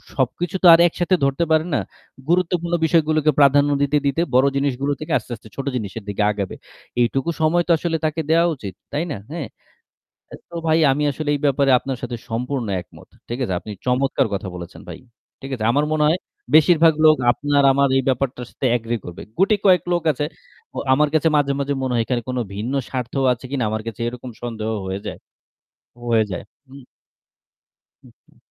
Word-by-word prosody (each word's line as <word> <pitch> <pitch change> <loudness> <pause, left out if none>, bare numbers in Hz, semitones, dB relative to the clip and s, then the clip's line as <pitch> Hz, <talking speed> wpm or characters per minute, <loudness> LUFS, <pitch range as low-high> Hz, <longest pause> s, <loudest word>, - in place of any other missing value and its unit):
সবকিছু 155 +7 -1
তো - - +8
আর 165 - +7
একসাথে 175 +2 0
ধরতে 140 +4 +1
পারেন 160 +2 +3
না। - - +2 0.5
গুরুত্বপূর্ণ 175 -1 +1
বিষয়গুলোকে 155 -2 +3
প্রাধান্য 145 +1 +5
দিতে, 145 +1 +2
দিতে 140 +4 0
বড় 130 +2 +5
জিনিসগুলো 140 0 -1
থেকে 155 - -6
আস্তে, 120 +1 -10
আস্তে 110 0 -16
ছোট 135 - -5
জিনিসের 110 -2 -5
দিকে 100 +1 -1
আগাবে। 100 -2 -4 0.5
এইটুকু 130 +5 0
সময় 170 +2 +3
তো - - +2
আসলে 165 0 -1
তাকে 155 +1 -1
দেওয়া 165 +2 +4
উচিত, 100 -8 -8 0.2
তাই 150 +3 0
না? 110 - -3
হ্যাঁ? 160 -6 -4 0.8
অ্যা - - -10
তো 170 - -11
ভাই 160 +1 +3
আমি 150 +2 0
আসলে 150 +2 -4
এই - - -3
ব্যাপারে 140 0 +3
আপনার 135 0 -4
সাথে 120 -1 -4
সম্পূর্ণ 125 +2 -2 0.2
একমত, - - -17 0.2
ঠিক 120 - -3
আছে? 95 - -2
আপনি 105 - -9
চমৎকার 130 0 +1
কথা 95 -1 -3
বলেছেন 85 0 -9
ভাই, - - -8 0.4
ঠিক 135 - -7
আছে? 110 - -5
আমার 145 +4 +2
মনে 155 -1 +1
হয় 165 +4 +2 0.4
বেশিরভাগ 160 +1 +6
লোক 155 0 +7
আপনার 145 +1 +1
আমার 140 0 +3
এই 135 - +1
ব্যাপারটার 125 -1 -2
সাথে - - -5
এগ্রি 115 0 -3
করবে। 90 0 -8 0.2
গুটি 200 +3 +4
কয়েক 185 -2 +5
লোক 175 -1 0
আছে 145 - -2 0.5
ও - - -7 0.2
আমার 150 +2 +3
কাছে 155 +1 +3
মাঝে, 140 -1 +1
মাঝে 140 0 -1
মনে 130 -1 -1
হয় 115 - +2
এখানে 125 -1 -1
কোনো 125 -1 -1
ভিন্ন 110 +6 -3 0.2
স্বার্থও 130 +1 -2
আছে 125 +2 -11
কিনা 135 -4 -1
আমার 110 0 -3
কাছে 115 0 -6
এরকম 125 +1 -7
সন্দেহ 110 -2 -4 0.2
হয়ে 95 +1 -3
যায় - - -6 0.9
হয়ে 115 -2 +3
যায়, 90 - -4 0.3
হুম? 135 -1 -13 1.2
হু, - - -16 0.2
হু। - - -26
140 Hz, 190 wpm, -21 LUFS, 120-155 Hz, 1.2 s, তো